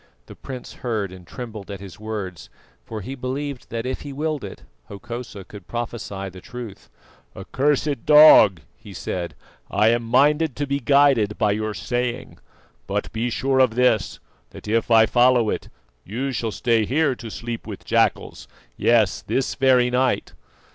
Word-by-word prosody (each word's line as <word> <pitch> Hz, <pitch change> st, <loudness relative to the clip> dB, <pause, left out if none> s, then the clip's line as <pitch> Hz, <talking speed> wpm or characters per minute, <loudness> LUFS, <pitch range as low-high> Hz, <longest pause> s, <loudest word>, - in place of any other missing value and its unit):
The -, -, -12 dB
prince 130 Hz, -2 st, -9 dB
heard 110 Hz, -7 st, -2 dB
and 90 Hz, -2 st, -13 dB
trembled 110 Hz, -5 st, -8 dB
at 100 Hz, -2 st, -6 dB
his 95 Hz, -1 st, -11 dB
words, 105 Hz, -5 st, -6 dB, 0.3 s
for 110 Hz, -, -7 dB
he 130 Hz, +7 st, -6 dB
believed 135 Hz, +1 st, -5 dB
that 115 Hz, 0 st, -4 dB
if 130 Hz, 0 st, -3 dB
he 145 Hz, -, -7 dB
willed 150 Hz, 0 st, -3 dB
it, 100 Hz, -, -9 dB, 0.2 s
Hokosa 105 Hz, 0 st, -8 dB
could 100 Hz, -1 st, -13 dB
prophesy 115 Hz, -5 st, -5 dB
the 95 Hz, -1 st, -10 dB
truth. 115 Hz, -, -9 dB, 0.5 s
"Accursed 140 Hz, -1 st, -1 dB
dog!" 150 Hz, -, +8 dB
he 105 Hz, -4 st, -13 dB
said. 85 Hz, -2 st, -4 dB, 0.3 s
"I 105 Hz, +2 st, +3 dB
am 120 Hz, +1 st, +2 dB
minded 145 Hz, +5 st, +2 dB
to 145 Hz, -, -2 dB
be 140 Hz, 0 st, -1 dB
guided 135 Hz, -6 st, +3 dB
by 105 Hz, -2 st, +2 dB
your 110 Hz, 0 st, -2 dB
saying; 120 Hz, +5 st, -3 dB, 0.5 s
but -, -, -2 dB
be 115 Hz, +2 st, -1 dB
sure 130 Hz, +2 st, 0 dB
of 125 Hz, -4 st, +3 dB
this, 125 Hz, -4 st, +1 dB, 0.3 s
that -, -, -12 dB
if 115 Hz, +2 st, 0 dB
I 115 Hz, -1 st, +6 dB
follow 120 Hz, -1 st, +3 dB
it, -, -, -5 dB, 0.3 s
you 130 Hz, +7 st, -3 dB
shall 120 Hz, -3 st, -2 dB
stay 115 Hz, +1 st, +1 dB
here 140 Hz, +5 st, +1 dB
to 120 Hz, -2 st, -9 dB
sleep 115 Hz, +1 st, -6 dB
with -, -, -8 dB
jackals, -, -, 0 dB, 0.3 s
yes, 110 Hz, -8 st, +2 dB
this 135 Hz, -, -1 dB
very 125 Hz, -2 st, +3 dB
night." 130 Hz, +1 st, 0 dB
120 Hz, 160 wpm, -22 LUFS, 105-130 Hz, 0.5 s, dog